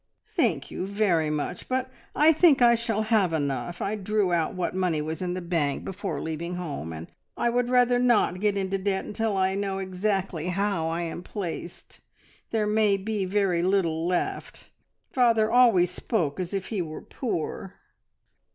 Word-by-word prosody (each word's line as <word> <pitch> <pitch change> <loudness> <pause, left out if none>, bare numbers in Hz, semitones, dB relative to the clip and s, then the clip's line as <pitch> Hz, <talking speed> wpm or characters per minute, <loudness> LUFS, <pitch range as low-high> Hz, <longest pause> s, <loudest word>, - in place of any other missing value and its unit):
"Thank 205 - 0
you 185 - -4
very 195 -6 +1
much, 150 -1 -3
but 260 0 -1 0.2
I 310 +2 +6
think 315 -3 +5
I 240 -1 +6
shall 225 -2 0
have 215 -6 +2
enough. 150 +3 -2
I 200 - -1
drew 210 -2 0
out 165 0 0
what 180 -1 -2
money 180 -4 0
was 160 +3 -4
in 180 -1 -2
the 185 - -4
bank 165 -5 -1
before 195 +1 -4
leaving 165 +2 -4
home, 145 - -5
and 80 0 -7 0.3
I 240 - +1
would 245 0 0
rather 245 -1 +4
not 240 -7 +3
get 205 0 +1
into 195 0 -1
debt 190 0 -1
until 215 -1 -1
I 190 0 +2
know 195 -1 -2
exactly 190 -3 -2
how 190 -2 0
I 170 +1 -2
am 170 +1 -5
placed. 180 -2 -7 0.5
There 220 -2 0
may 210 -1 +3
be 200 0 -2
very 185 -3 +1
little 170 -3 +1
left. 180 -1 -3 0.4
Father 230 -4 +3
always 230 -8 +5
spoke 175 -7 -1
as 180 -2 -3
if 195 -2 -3
he 210 -5 -1
were 155 -2 -6
poor." 195 - -4
190 Hz, 170 wpm, -26 LUFS, 175-215 Hz, 0.5 s, I